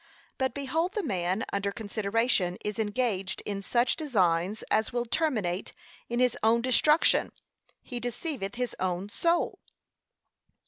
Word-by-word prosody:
But 265 0 0
behold 320 +7 -1
the 420 - 0
man 190 - -1
under 200 0 0
consideration 205 -3 0
is 210 +2 -3
engaged 205 -3 -1
in 200 -1 -3
such 240 +5 +2
designs 195 - +1
as 220 0 +2
will 240 0 -1
terminate 225 - -1 0.4
in 240 +1 -1
his 250 -2 +3
own 230 +2 +3
destruction: 300 +5 +4 0.5
he 245 -2 -5
deceiveth 240 - -3
his 250 0 -2
own 185 +1 -1
soul. 335 +9 +1
225 Hz, 130 wpm, -28 LUFS, 200-255 Hz, 0.5 s, destruction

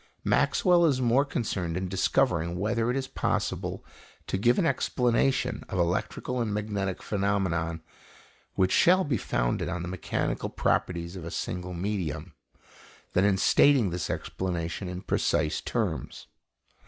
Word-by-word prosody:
Maxwell 175 -2 +3
is 135 -4 +1
more 125 +2 +3
concerned 95 - -2
in 95 0 -2
discovering 90 -3 +1
whether 115 +4 0
it 125 - 0
is 135 -1 -2
possible - - -2 0.4
to - - -2
give 120 +4 +3
an 190 - +2
explanation 125 -3 +1
of 95 - -3
electrical 90 +8 -1
and 110 -3 -1
magnetic 100 -2 -2
phenomena 95 -5 -1 0.7
which 95 0 +2
shall 185 +2 +5
be 145 -7 0
founded - - -1
on 90 0 -3
the - - -4
mechanical 90 -1 -2
properties 85 0 -1
of 90 - -7
a 85 - -5
single 90 +1 -4
medium, 85 -4 -3 0.8
than 90 - +3
in 100 -2 +3
stating 125 -1 +4
this 90 0 -3
explanation 90 0 -3
in 90 0 -5
precise - - 0
terms. - - -3
95 Hz, 140 wpm, -28 LUFS, 90-120 Hz, 0.8 s, shall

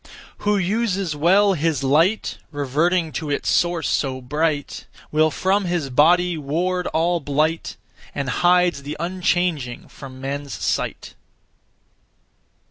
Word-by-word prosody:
Who 210 0 +1
uses 195 -3 -1
well 195 +6 +4
his 155 -4 0
light, 165 +10 +2
Reverting 155 +4 0
to 155 -1 -4
its 145 - -1
(source 175 -1 +1
so) 130 -2 -1
bright, 150 +3 -2 0.2
Will 155 +1 +3
from 190 +7 0
his 170 -6 -2
body 175 +5 +3
ward 175 +5 -1
all 170 +2 +1
blight, 155 +3 -1 0.4
And 140 -2 -2
hides 175 +3 +2
the 145 +2 -6
unchanging 175 - -1
from 130 -2 -11
men's 140 +1 -4
sight. - - -3
165 Hz, 120 wpm, -22 LUFS, 145-180 Hz, 0.4 s, well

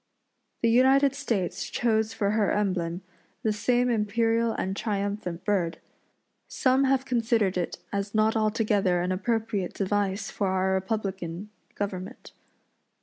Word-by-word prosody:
The 230 - +4
United 265 +3 +5
States 230 -10 -2
chose 220 -2 +1
for 205 -3 0
her 215 -1 +2
emblem 185 -3 -1 0.4
the 220 - +2
same 245 +4 +1
imperial 225 +1 +1
and 190 +1 -2
triumphant 200 -4 -3
bird. 185 -5 0 0.7
Some 265 +1 +2
have 265 0 +2
considered 230 -6 +1
it 180 -2 -2 0.2
as 200 +1 -2
not 215 +1 +3
altogether 210 -4 +2
an 180 - -1
appropriate 215 0 -1
device 200 0 -1
for 200 - -1
our 190 0 +1
republican 190 -1 -3 0.2
government. 200 +3 -5
210 Hz, 125 wpm, -27 LUFS, 190-230 Hz, 0.7 s, United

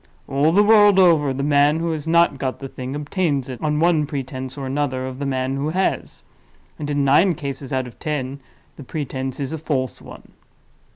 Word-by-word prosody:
All 140 +4 +2
the 200 +4 +5
world 205 -2 +6
over, 165 -7 +5
the 135 +1 -3
man 145 +1 +3
who 165 0 -1
has 155 -1 -4
not 170 -4 +3
got 130 -1 -2
the 135 - -7
thing, 130 +1 -6
obtains 145 -3 -1
it, 125 - -7
on 150 -1 0
one 160 -3 +2
pretense 130 -2 -5
or 135 - -5
another, 130 -1 -2
of 130 0 -7
the 140 - -2
man 130 0 -1
who 145 +2 -1
has—and, 160 -3 -5
in 145 -1 +1
nine 165 +6 +4
cases 140 -2 -6
out 130 -1 0
of 125 - -12
ten, 140 -3 -3 0.4
the 145 - -9
pretense 130 -2 -4
is 140 +1 -3
a 160 - -4
false 135 -5 -2
one. - - -13
145 Hz, 195 wpm, -21 LUFS, 130-155 Hz, 0.4 s, world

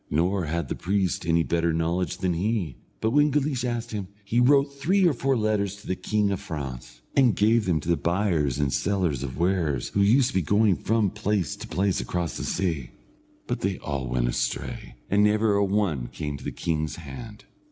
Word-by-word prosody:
Nor 90 +4 +1
had 80 0 -2
the - - -2
priest 95 -3 -1
any 85 0 +3
better 85 0 +1
knowledge 85 +3 -1
than 90 -2 0
he; 90 - -1 0.3
but 110 - +1
when 145 +3 +4
Guleesh 140 -3 0
asked 120 -1 -2
him, 105 -3 -4 0.2
he 115 +4 +1
wrote 140 +2 +4
three 180 +8 +2
or 165 - +3
four 135 +1 +1
letters 105 -3 0
to 100 - -16
the 95 - -1
king 105 +2 0
of 95 - -1
France, 65 -5 -7
and 125 -7 +4
gave 110 +3 +3
them 85 -4 +1
to 85 +3 +1
buyers 85 - 0
and 70 -2 0
sellers 85 -3 0
of 65 -2 -5
wares, 85 -7 0
who 100 - +1
used 120 +6 +4
to - - -8
be 95 - +2
going 105 +3 +3
from 110 0 +1
place 105 -5 -1
to - - -9
place 95 0 0
across 85 -2 -3
the - - -4
sea; 80 -9 -1 0.6
but - - -2
they 95 -1 -1
all 70 -3 -4
went - - 0
astray, - - -3
and 100 +1 +3
never 105 0 +3
a 100 0 +3
one 95 -11 0
came 75 +1 -5
to 70 - -10
the - - -3
king's 80 -2 -2
hand. 85 - -9
95 Hz, 205 wpm, -26 LUFS, 80-110 Hz, 0.6 s, when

